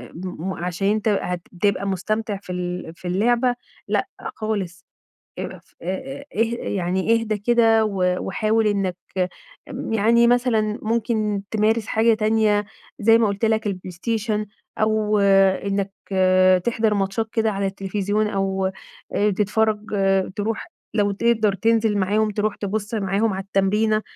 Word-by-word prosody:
م 185 Hz, +1 st, -5 dB
عشان 180 Hz, +2 st, -2 dB
أنت 215 Hz, +1 st, +1 dB
هتبقى 195 Hz, 0 st, -1 dB
مستمتع 210 Hz, +3 st, -2 dB
في 185 Hz, -, -8 dB
ال 180 Hz, -2 st, -4 dB
في 180 Hz, -, -9 dB
اللعبة 240 Hz, +6 st, +2 dB, 0.3 s
لأ، -, -, 0 dB, 0.3 s
خالص 200 Hz, -4 st, -4 dB, 0.5 s
اقف -, -, -8 dB
آآ 270 Hz, +11 st, -5 dB
اه -, -, -5 dB, 0.3 s
يعني 185 Hz, +2 st, 0 dB
اهدى 225 Hz, -2 st, 0 dB
كده 225 Hz, 0 st, +4 dB
و 180 Hz, -3 st, 0 dB
وحاول 215 Hz, +3 st, +1 dB
إنّك 195 Hz, -3 st, 0 dB, 0.7 s
ام -, -, -5 dB
يعني 230 Hz, +2 st, +4 dB
مثلًا 235 Hz, -3 st, +2 dB
ممكن 215 Hz, -2 st, 0 dB
تمارس 220 Hz, 0 st, +1 dB
حاجة 225 Hz, +1 st, +3 dB
تانية 215 Hz, -1 st, +2 dB, 0.4 s
زي 225 Hz, +2 st, +6 dB
ما 230 Hz, -, +3 dB
قُلت 200 Hz, +2 st, -2 dB
لك 220 Hz, 0 st, +1 dB
البلايستيشن 210 Hz, +3 st, -2 dB, 0.3 s
أو 215 Hz, -1 st, +2 dB
إنّك 195 Hz, 0 st, +3 dB, 0.7 s
تحضر 225 Hz, -2 st, +1 dB
ماتشات 200 Hz, +3 st, -1 dB
كده 225 Hz, -1 st, +1 dB
على 195 Hz, 0 st, -1 dB
التليفزيون 200 Hz, +2 st, -1 dB
أو 195 Hz, -1 st, -1 dB, 0.5 s
آآ 210 Hz, +1 st, +3 dB
تتفرّج 210 Hz, +2 st, 0 dB, 0.5 s
تروح 215 Hz, +2 st, -3 dB, 0.2 s
لو 205 Hz, -2 st, +2 dB
تقدر 215 Hz, -1 st, +2 dB
تنزِل 220 Hz, +1 st, +2 dB
معاهم 210 Hz, +3 st, +1 dB
تروح 210 Hz, 0 st, -1 dB
تبُص 205 Hz, +2 st, -3 dB
معاهم 205 Hz, +1 st, +1 dB
على 190 Hz, 0 st, -4 dB
التمرينة 210 Hz, +3 st, +1 dB
210 Hz, 130 wpm, -22 LUFS, 195-220 Hz, 0.7 s, زي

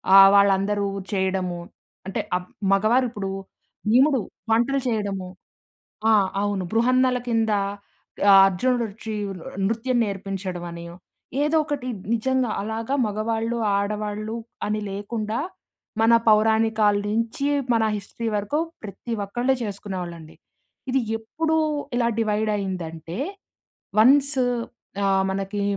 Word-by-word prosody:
ఆహ్, 195 Hz, 0 st, +10 dB
వాళ్ళందరూ 200 Hz, +1 st, +3 dB, 0.3 s
చేయడము. 190 Hz, -2 st, -1 dB, 0.5 s
అంటే 190 Hz, -, -2 dB, 0.2 s
అప్ 180 Hz, 0 st, -9 dB, 0.2 s
మగవారిప్పుడూ 215 Hz, -1 st, +1 dB, 0.6 s
బీముడు, 265 Hz, +1 st, +5 dB, 0.3 s
వంటలు 245 Hz, +5 st, +3 dB
చేయడము. 200 Hz, -5 st, -2 dB, 0.8 s
ఆ! -, -, +6 dB, 0.3 s
అవును. 205 Hz, -2 st, -1 dB
బృహన్నల 255 Hz, +2 st, +3 dB
కిందా 220 Hz, -3 st, +2 dB, 0.7 s
ఆహ్, 195 Hz, -, +9 dB
అర్జునుడొచ్చి 220 Hz, +2 st, -1 dB, 0.2 s
ఆహ్, 185 Hz, -, -7 dB, 0.2 s
న్ 195 Hz, -, +2 dB
నృత్యం 230 Hz, +3 st, 0 dB
నేర్పించడమని 185 Hz, -4 st, -5 dB, 0.6 s
ఏదోకటి 295 Hz, -4 st, 0 dB
బ్ -, -, -15 dB
నిజంగా 255 Hz, +1 st, +1 dB
అలాగా 225 Hz, +5 st, -2 dB
మగవాళ్ళు, 225 Hz, +2 st, -1 dB, 0.2 s
ఆడవాళ్ళు 210 Hz, +1 st, -3 dB, 0.3 s
అని 215 Hz, +1 st, -1 dB
లేకుండా, 215 Hz, +3 st, -3 dB, 0.6 s
మన 225 Hz, +1 st, +5 dB
పౌరాణికాల 220 Hz, -1 st, +4 dB
నుంచి 230 Hz, +5 st, -1 dB, 0.3 s
మన 225 Hz, -, +3 dB
హిస్టరీ 205 Hz, +3 st, -6 dB
వరకు 210 Hz, +9 st, -1 dB, 0.3 s
ప్రతి 205 Hz, +3 st, -8 dB
ఒక్కళ్ళు 240 Hz, +6 st, 0 dB
చేసుకునేవాళ్ళండి. 180 Hz, -6 st, -6 dB, 0.5 s
ఇది 265 Hz, +1 st, +2 dB, 0.2 s
ఎప్పుడు 315 Hz, +9 st, -2 dB, 0.4 s
ఇలా 235 Hz, -1 st, +2 dB
డివైడ్ 215 Hz, -1 st, +1 dB
అయిందంటే 170 Hz, -3 st, -5 dB, 0.8 s
వన్స్ 275 Hz, +5 st, +5 dB, 0.7 s
ఆహ్, 195 Hz, -1 st, +3 dB
మనకి 195 Hz, +1 st, -3 dB
215 Hz, 100 wpm, -24 LUFS, 195-235 Hz, 0.8 s, ఆహ్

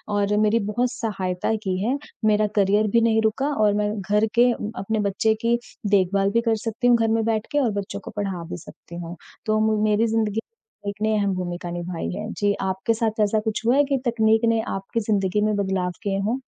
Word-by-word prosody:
और 205 Hz, 0 st, +1 dB
मेरी 215 Hz, +2 st, +3 dB
बहुत 245 Hz, +3 st, 0 dB
सहायता 190 Hz, -3 st, -2 dB
की 185 Hz, -1 st, -1 dB
है, 255 Hz, +5 st, +1 dB, 0.3 s
मेरा 215 Hz, 0 st, +3 dB
करियर 205 Hz, +2 st, +3 dB
भी 230 Hz, -, +6 dB
नहीं 225 Hz, -1 st, +3 dB
रुका 220 Hz, +6 st, 0 dB
और 205 Hz, -1 st, +4 dB
मैं 210 Hz, 0 st, 0 dB
घर 210 Hz, +3 st, +2 dB
के 245 Hz, +1 st, +6 dB
अपने 220 Hz, -1 st, -3 dB
बच्चे 220 Hz, +3 st, +2 dB
की 235 Hz, 0 st, +3 dB, 0.3 s
देखभाल 195 Hz, 0 st, +3 dB
भी 230 Hz, -, +2 dB
कर 230 Hz, -1 st, +1 dB
सकती 230 Hz, +3 st, 0 dB
हूँ, 240 Hz, -, +6 dB
घर 225 Hz, -1 st, +1 dB
में 225 Hz, 0 st, +2 dB
बैठ 220 Hz, -1 st, 0 dB
के 290 Hz, -, +2 dB
और 225 Hz, -, +1 dB
बच्चों 200 Hz, 0 st, -4 dB
को -, -, -9 dB
पढ़ा 195 Hz, -4 st, -3 dB
भी -, -, -5 dB
सकती 170 Hz, +1 st, -13 dB
हूँ। 170 Hz, +1 st, -7 dB, 0.3 s
तो 215 Hz, 0 st, +2 dB
म 215 Hz, -1 st, +2 dB
मेरी 215 Hz, +2 st, +3 dB
ज़िंदगी 220 Hz, -1 st, 0 dB
में 340 Hz, -, -12 dB, 0.4 s
तकनीक 200 Hz, -, -13 dB
ने 220 Hz, 0 st, +2 dB
अहम 200 Hz, -2 st, +1 dB
भूमिका 175 Hz, -1 st, -4 dB
निभाई 175 Hz, 0 st, -4 dB
है। 215 Hz, +2 st, -5 dB
जी, 205 Hz, -1 st, +1 dB
आपके 190 Hz, +4 st, 0 dB
साथ 220 Hz, -1 st, -1 dB
ऐसा 215 Hz, +1 st, +2 dB
कुछ 220 Hz, +1 st, -2 dB
हुआ 240 Hz, -, +4 dB
है 290 Hz, -, +5 dB
कि 275 Hz, -1 st, 0 dB
तकनीक 220 Hz, -2 st, +3 dB
ने 225 Hz, -1 st, +2 dB
आपकी 195 Hz, +4 st, -3 dB
ज़िंदगी 195 Hz, 0 st, +1 dB
में 215 Hz, -1 st, +1 dB
बदलाव 190 Hz, -2 st, -1 dB
किए 195 Hz, -2 st, -1 dB
हों? 225 Hz, +7 st, -1 dB
215 Hz, 220 wpm, -23 LUFS, 195-225 Hz, 0.4 s, भी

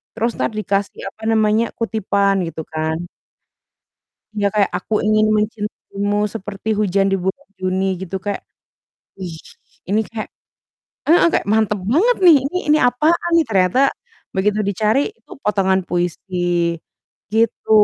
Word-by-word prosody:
terus 230 Hz, +1 st, 0 dB
entar -, -, 0 dB
dikasih, 200 Hz, -1 st, -2 dB
apa 220 Hz, -, -19 dB
namanya, 220 Hz, +1 st, +3 dB
kutipan, 200 Hz, -3 st, +1 dB
gitu 160 Hz, -1 st, -6 dB
kan. 160 Hz, +1 st, -2 dB, 1.3 s
Iya, 205 Hz, -1 st, +1 dB
kayak, 205 Hz, -2 st, +3 dB
"Aku 205 Hz, -, -5 dB
ingin 215 Hz, 0 st, +3 dB
mencintaimu 210 Hz, -1 st, -2 dB
seperti 205 Hz, 0 st, -6 dB
hujan 195 Hz, -1 st, +2 dB
di 195 Hz, -, +2 dB
bulan 190 Hz, +10 st, -3 dB
Juni," 185 Hz, +1 st, 0 dB, 0.2 s
gitu, 190 Hz, 0 st, -5 dB
kayak, 205 Hz, +1 st, -4 dB, 0.8 s
wih, 180 Hz, -4 st, -6 dB, 0.5 s
ini 210 Hz, +2 st, +2 dB
kayak 220 Hz, -2 st, -5 dB, 0.8 s
heeh, 335 Hz, +3 st, +6 dB
kayak -, -, 0 dB
mantap 215 Hz, -1 st, +2 dB
banget 450 Hz, -, +4 dB
nih 330 Hz, -4 st, +9 dB, 0.3 s
ini, 305 Hz, -, +6 dB
apaan 310 Hz, +8 st, +2 dB
nih, 330 Hz, -, +4 dB
ternyata 190 Hz, +3 st, +2 dB, 0.6 s
begitu 210 Hz, +2 st, +1 dB
dicari 210 Hz, +5 st, +1 dB, 0.2 s
itu -, -, -25 dB
potongan 190 Hz, -2 st, +2 dB
puisi, 175 Hz, +1 st, -2 dB, 1.0 s
gitu. 225 Hz, 0 st, +1 dB
210 Hz, 130 wpm, -19 LUFS, 190-220 Hz, 1.3 s, nih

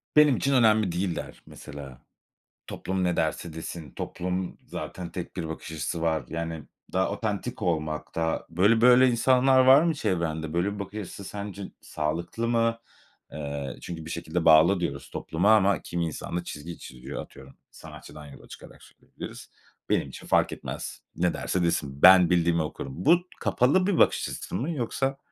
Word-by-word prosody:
"Benim 150 Hz, -4 st, +6 dB
için 140 Hz, -, 0 dB
önemli 110 Hz, -6 st, +4 dB
değil" 90 Hz, 0 st, -1 dB
der -, -, -7 dB
mesela. 70 Hz, -3 st, -10 dB, 0.7 s
"Toplum 95 Hz, 0 st, -3 dB
ne 90 Hz, -1 st, +1 dB
derse 85 Hz, -, -1 dB
desin, 80 Hz, -2 st, -7 dB
toplum 90 Hz, +5 st, -4 dB
zaten 90 Hz, -2 st, -6 dB
tek 90 Hz, +2 st, -7 dB
bir 80 Hz, -3 st, -4 dB
bakış 80 Hz, 0 st, -7 dB
açısı 80 Hz, +1 st, -3 dB
var." 80 Hz, -4 st, 0 dB
Yani, 80 Hz, -1 st, -4 dB, 0.3 s
daha 95 Hz, 0 st, +1 dB
otantik 110 Hz, +3 st, -3 dB
olmak 75 Hz, -2 st, -2 dB
da 80 Hz, 0 st, -1 dB
Böyle, 100 Hz, +7 st, +3 dB
böyle, 125 Hz, +1 st, +7 dB
insanlar 130 Hz, +2 st, +4 dB
var 130 Hz, +2 st, +7 dB
mı 165 Hz, 0 st, +2 dB
çevrende? 80 Hz, -, -2 dB
Böyle 90 Hz, +4 st, 0 dB
bir 105 Hz, -, -8 dB
bakış 100 Hz, +2 st, -6 dB
açısı 100 Hz, 0 st, -8 dB
sence 100 Hz, 0 st, -6 dB, 0.2 s
sağlıklı 85 Hz, +9 st, -3 dB
mı? 115 Hz, -1 st, +1 dB, 0.5 s
Eee, 70 Hz, -2 st, -5 dB
çünkü 85 Hz, -2 st, -7 dB
bir -, -, -8 dB
şekilde 85 Hz, 0 st, -3 dB
bağlı 80 Hz, +4 st, +6 dB
diyoruz 70 Hz, -5 st, -4 dB
topluma 100 Hz, +7 st, +2 dB
ama 100 Hz, -2 st, +3 dB
kimi 85 Hz, -1 st, -2 dB
insan 80 Hz, +2 st, -4 dB
da 85 Hz, -, -3 dB
çizgi 85 Hz, +1 st, -7 dB
çiziyor, 65 Hz, +3 st, -8 dB
atıyorum, 65 Hz, 0 st, -13 dB, 0.2 s
sanatçıdan 75 Hz, -1 st, -12 dB
yola 70 Hz, -, -13 dB
çıkarak -, -, -13 dB
söyleyebiliriz. -, -, -11 dB, 0.4 s
"Benim -, -, +1 dB
için -, -, -11 dB
fark -, -, +3 dB
etmez, -, -, -7 dB
ne 90 Hz, 0 st, +1 dB
derse 90 Hz, -, -1 dB
desin, 70 Hz, -5 st, -1 dB
ben 90 Hz, -2 st, +8 dB
bildiğimi 85 Hz, -1 st, +2 dB
okurum." 70 Hz, -3 st, -6 dB
Bu, 165 Hz, +4 st, +7 dB, 0.2 s
kapalı 165 Hz, +10 st, +2 dB
bir 195 Hz, -, +1 dB
bakış -, -, +3 dB
açısı -, -, -6 dB
mı, 145 Hz, +7 st, -2 dB
yoksa? 135 Hz, -1 st, -2 dB
90 Hz, 165 wpm, -26 LUFS, 80-110 Hz, 0.7 s, ben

